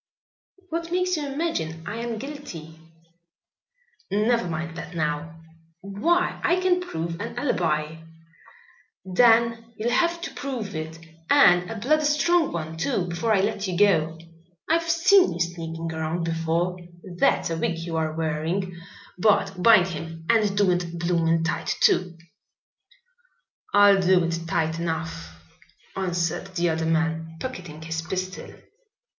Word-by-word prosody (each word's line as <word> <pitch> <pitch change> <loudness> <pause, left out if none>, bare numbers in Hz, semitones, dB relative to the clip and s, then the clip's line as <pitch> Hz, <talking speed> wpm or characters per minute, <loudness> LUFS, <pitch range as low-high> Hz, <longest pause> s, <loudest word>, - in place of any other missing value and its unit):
"What 335 +1 -3
makes 365 0 +1
you 300 -2 -3
imagine 165 - -3
I 205 +5 -5
am 235 -1 -3
guilty?" 215 - -8 1.3
"Never 215 +1 +1
mind 165 0 -4
that 175 +1 -8
now." 155 +1 -3 0.4
"Why, 320 - 0
I 355 +1 +3
can 365 -1 +2
prove 165 - -4
an 230 - -6
alibi." 160 - 0 1.1
"Then 230 +3 +3
you'll 230 +3 -1
have 340 +6 +2
to - - -6
prove 250 -8 -5
it, 160 +1 -5 0.3
and 180 -11 +5
a 225 - -5
bloody 300 +8 +1
strong 315 +2 +2
one 160 -1 -5
too, 190 -2 -1
before 175 +7 -1
I 200 -3 +4
let 205 0 -1
you 180 -2 -2
go. 165 -6 +3 0.5
I've 330 +1 +1
seen 360 - +5
you 170 - -7
sneaking 165 -1 -3
around 160 +2 -2
before. 165 +2 -1 0.4
That's 170 - +2
a 165 - -1
wig 165 +1 -1
you 165 0 -5
are 160 -1 0
wearing. 165 +4 -2 0.4
Bart, 200 -1 +3
bind 190 -4 +6
him, 165 -1 -7
and 210 -3 +2
do 200 -3 +4
it 175 -1 -2
bloomin' 165 -1 +1
tight, 165 - -1
too." 175 -2 +2 1.5
"I'll 205 -1 +6
do 185 -1 +4
it 165 0 -1
tight 160 0 0
enough," 160 - -4 0.6
answered 180 0 -2
the 175 -1 +1
other 160 0 -1
man, 160 0 -1
pocketing 180 -12 -7
his 165 0 -3
pistol. 185 +3 -5
180 Hz, 140 wpm, -25 LUFS, 165-230 Hz, 1.5 s, bind